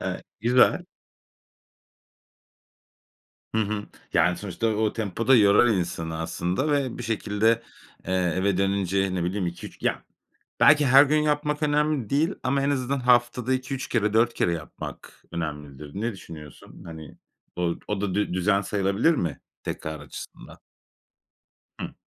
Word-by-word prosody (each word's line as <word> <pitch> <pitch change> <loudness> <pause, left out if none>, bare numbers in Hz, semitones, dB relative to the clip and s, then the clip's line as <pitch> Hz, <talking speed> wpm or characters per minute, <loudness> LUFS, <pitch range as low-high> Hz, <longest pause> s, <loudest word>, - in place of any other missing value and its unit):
Evet, - - -4 0.2
güzel. 125 - +4 2.7
Hı 110 - +3
hı. 105 0 -2 0.3
Yani, 90 +1 +3
sonuçta 100 +2 -3
o 110 0 0
tempo 110 +1 -3
da 135 - +7
yorar 105 +2 +6
insanı 85 -5 -2
aslında 90 - -1
ve 140 -4 0
bir 120 - -6
şekilde, 110 +1 +1 0.5
eee, 95 - -1 0.2
eve 95 0 +1
dönünce, 95 -1 0
ne 90 - -1
bileyim, 90 0 -1
2-3 85 - -8
ya - - -1 0.6
Belki 150 -1 +6
her 135 +1 +8
gün 155 +2 +2
yapmak 150 0 0
önemli 150 -5 +1
değil 155 +7 +1
ama 140 +1 +1
en 140 - +1
azından 135 0 -1
haftada 125 0 +2
2-3 130 +1 -3
kere, 105 -3 +1
4 115 +2 +3
kere 85 - +1
yapmak 80 -2 -8
önemlidir. 75 -3 -6
Ne 115 +3 -2
düşünüyorsun? 75 -7 -12
Hani, 80 -3 -10 0.4
o 85 -1 0
o 105 -2 -2
da 100 -2 -2
dü 105 -3 0
düzen 100 +2 +2
sayılabilir 100 - +1
mi 85 - -2 0.2
tekrar 80 0 -5
açısından? 75 - -10 1.2
Hıı. - - -5
105 Hz, 140 wpm, -25 LUFS, 90-130 Hz, 2.7 s, her